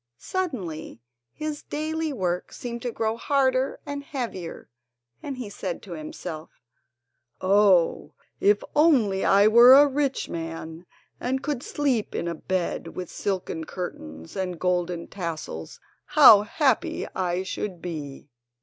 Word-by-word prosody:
Suddenly 190 - -4 0.3
his 305 -1 -5
daily 315 +1 -3
work 180 -8 -2
seemed 235 -1 -6
to 245 - -3
grow 225 0 -1
harder 260 0 +1
and 285 -1 -5
heavier, 235 - -6 0.5
and 275 -2 -5
he 250 -4 -5
said 190 -3 -5
to 190 - -11
himself: 155 0 -7 0.9
"Oh, 190 -3 +3 0.2
if 205 0 +3
only 255 -12 +4
I 200 +2 +5
were 235 +3 +9
a 285 +1 +8
rich 280 -1 -1
man, 165 +1 -6 0.3
and 265 +2 -2
could 290 -4 -2
sleep 265 -8 -1
in - - -2
a 170 - -1
bed 180 +2 -3
with 180 -2 -6
silken 185 -4 -3
curtains 80 - -7
and 180 -3 -3
golden 180 -1 -1
tassels, 160 - -6 0.3
how 205 - +8
happy 255 +4 0
I 180 0 -1
should 190 -1 -4
be!" 150 -5 -7
195 Hz, 130 wpm, -25 LUFS, 170-260 Hz, 0.9 s, were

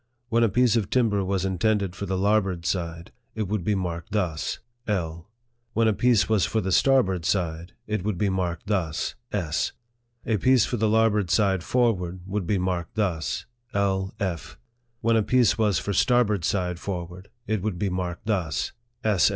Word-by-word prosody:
When 115 +1 +3
a 115 - +4
piece 120 +2 +3
of 110 -5 0
timber 110 -6 +2
was 95 0 -1
intended 95 0 0
for 100 - -5
the 95 0 -1
larboard 95 -3 +1
side, 85 -2 -3 0.2
it 110 - -1
would 105 -1 -1
be 105 +3 +1
marked 85 -1 -4
thus 85 -8 -1 0.2
" 120 0 -40
L." 85 +1 -7 0.4
When 115 0 +3
a 110 - +3
piece 115 -3 +3
was 110 -4 +2
for 110 - +1
the 95 -3 -2
starboard 95 -7 +3
side, 85 -1 -1
it 105 -3 -2
would 105 -3 -1
be 100 - +1
marked 90 -3 -2
thus 90 -7 -1
" 120 - -50
S." 85 -6 -1 0.5
A 110 - +1
piece 130 +2 +4
for 120 - -2
the 110 0 +2
larboard 105 -3 +3
side 95 -2 +2
forward, 95 -8 0
would 95 -2 -3
be 100 - +2
marked 90 -1 -2
thus 90 -9 -1
" 120 +1 -40
L. 95 -1 0
F." 85 -9 -3 0.4
When 115 +1 +3
a 110 - +4
piece 120 -1 +3
was 105 -4 +3
for 100 - -2
starboard 110 -5 +3
side 90 -3 -1
for 90 -3 -3
ward, 90 +3 -13 0.2
it 110 -3 -1
would 105 -3 -2
be 100 +1 -1
marked 90 0 -3
thus 90 -8 -1 0.2
" 120 0 -45
S. 105 -6 +4
100 Hz, 195 wpm, -25 LUFS, 90-110 Hz, 0.5 s, a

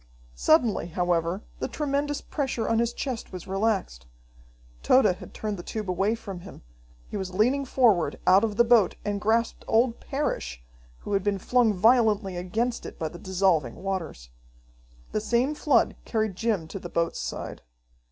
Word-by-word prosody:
Suddenly, 165 - +3
however, 175 +2 0 0.2
the - - -2
tremendous 290 +1 -2
pressure 265 -6 -2
on 225 0 +2
his 235 0 +1
chest 250 -2 -5
was 185 -2 -7
relaxed. 195 - -1 0.7
Tode 255 -2 +5
had 185 -3 -1
turned 210 -2 -4
the - - -6
tube 215 +3 -5
away 195 +5 +1
from 195 -5 -8
him. 180 - -12 0.5
He - - -3
was 185 -2 -5
leaning 255 +7 +2
forward 215 - +2
out 190 +3 +6
of 210 -2 -1
the 235 - +7
boat 230 -5 +4
and 205 -1 -2
grasped 230 +2 +1
old 235 +1 +2
Parrish, 65 - -3 0.4
who 205 - -5
had 195 -1 +1
been 205 -1 +1
flung 240 +3 +3
violently 215 -2 +3
against 220 +7 -2
it - - -10
by 160 - -3
the 175 - -11
dissolving 180 -10 +1
waters. 175 - -5 0.8
The 215 - -1
same 240 +6 +1
flood 290 -5 +2
carried 220 -4 -1
Jim 205 -6 -1
to 195 - -6
the 175 - -8
boat's 170 0 -1
side. - - -5
205 Hz, 165 wpm, -26 LUFS, 180-235 Hz, 0.8 s, the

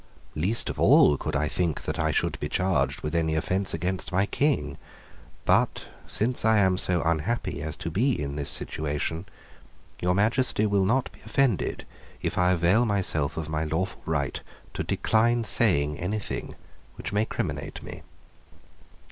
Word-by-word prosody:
Least 95 +9 0
of - - -9
all 75 - +6
could 75 +2 -4
I 75 +1 +1
think 85 -2 -1
that - - -3
I 80 0 +1
should - - 0
be 75 - -3
charged 75 -6 0
with 75 - -3
any 80 -2 +1
offence 95 +4 0
against 90 +4 -3
my 95 +2 +2
King: 100 - 0 0.7
but, - - +2 0.2
since 120 +4 -1
I 110 0 +4
am 95 -2 +3
so 90 -2 0
unhappy 85 +8 -1
as 75 0 -4
to 85 - -5
be 120 - +1
in 70 -1 -3
this 75 -2 -3
situation, 80 +3 -3 0.7
your 90 +1 +1
Majesty 110 +2 +3
will 100 -2 +2
not 125 +6 +1
be - - -19
offended 135 -8 0 0.3
if - - -2
I 90 +1 +4
avail 90 +7 +3
myself 80 -8 0
of 80 -2 -3
my 80 0 -1
lawful 80 +5 -2
right 70 -4 -1 0.3
to - - -2
decline 115 +2 +2
saying 75 -11 +2
anything 100 +4 -3 0.4
which - - -6
may 105 +1 +2
criminate - - -4
me." - - -8
90 Hz, 160 wpm, -26 LUFS, 75-105 Hz, 0.7 s, all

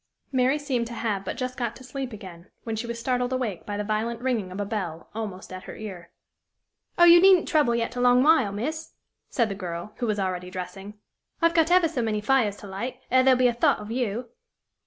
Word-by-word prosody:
Mary 260 +2 +2
seemed 260 -5 -2
to 235 - -7
have 210 -4 -2
but 190 - -5
just 255 0 -3
got 240 -2 -3
to 260 - -13
sleep 260 0 -5
again, 185 -5 -11
when 225 -1 -3
she 225 +2 -4
was 235 0 -4
startled 250 +1 -1
awake 245 -8 -3
by 205 -1 -3
the 210 - -2
violent 220 +2 -2
ringing 235 -7 -1
of 185 - -6
a 205 - -1
bell, 185 -6 -5
almost 200 -4 -6
at 185 - -8
her - - -8
ear. 190 -6 -8 0.9
"Oh, 345 - +6
you 345 0 +9
needn't 375 -2 +6
trouble 290 -7 +3
yet 230 +1 -2
a 245 - -2
long 250 +1 +5
while, 305 -9 +4
miss!" 305 +10 -4 0.4
said 235 -3 +1
the 200 - -4
girl, 180 +1 -6
who 240 - -2
was 210 -1 0
already 185 -2 -2
dressing. 190 +3 -7 0.4
"I've 335 0 +3
got 325 -1 +3
ever 360 -1 +5
so 305 -6 -2
many 220 -2 0
fires 210 -2 +2
to 205 - -10
light, 200 +7 -5
ere 260 +1 +6
there'll 260 -1 +5
be 250 0 +4
a 240 - +1
thought 235 - +3
of 210 +1 -8
you!" 240 -1 -2
230 Hz, 230 wpm, -26 LUFS, 205-255 Hz, 0.9 s, you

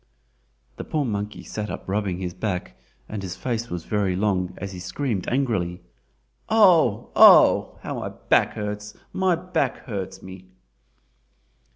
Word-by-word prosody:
The - - -5
poor 150 -2 -1
monkey 105 -2 -4
sat 105 -1 -5
up - - -6
rubbing 100 -2 -1
his 90 -1 -4
back, 95 -3 -4 0.3
and 105 -2 -5
his 90 -2 -5
face 120 -2 -3
was 85 -2 -4
very 100 -3 0
long 95 -2 0
as 100 0 -6
he 90 - -8
screamed 110 0 -3
angrily. 95 -10 -1 0.7
"Oh, 175 - +4
oh! - - +7
how - - -4
my - - -4
back - - +1
hurts—my 105 - -2
back 165 -6 -2
hurts 95 -5 -6
me!" 95 0 -11
105 Hz, 140 wpm, -24 LUFS, 95-125 Hz, 0.7 s, oh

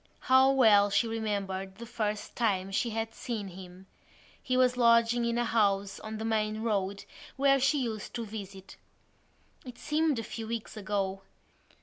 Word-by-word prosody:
How 260 +1 +5
well 215 -6 +5
she 200 +4 +2
remembered 200 -4 -3
the 235 +4 -9
first 210 -2 -3
time 195 -5 0
she 225 +4 0
had 225 0 -3
seen 220 -5 -5
him; 185 0 -12 0.6
he 255 -1 -1
was 250 -1 +3
lodging 235 0 +4
in 235 0 0
a 240 - +1
house 200 -4 +1
on 220 0 -6
the 220 - -4
main 215 -1 -1
road 200 -3 -1 0.3
where 275 0 +3
she 275 +1 +2
used 220 -3 -5
to 235 -1 -3
visit. 200 -3 -9 0.9
It 250 -2 -10
seemed 305 -1 0
a 225 - -3
few 225 0 -6
weeks 230 -1 -5
ago. 195 -2 -2
220 Hz, 160 wpm, -29 LUFS, 200-235 Hz, 0.9 s, How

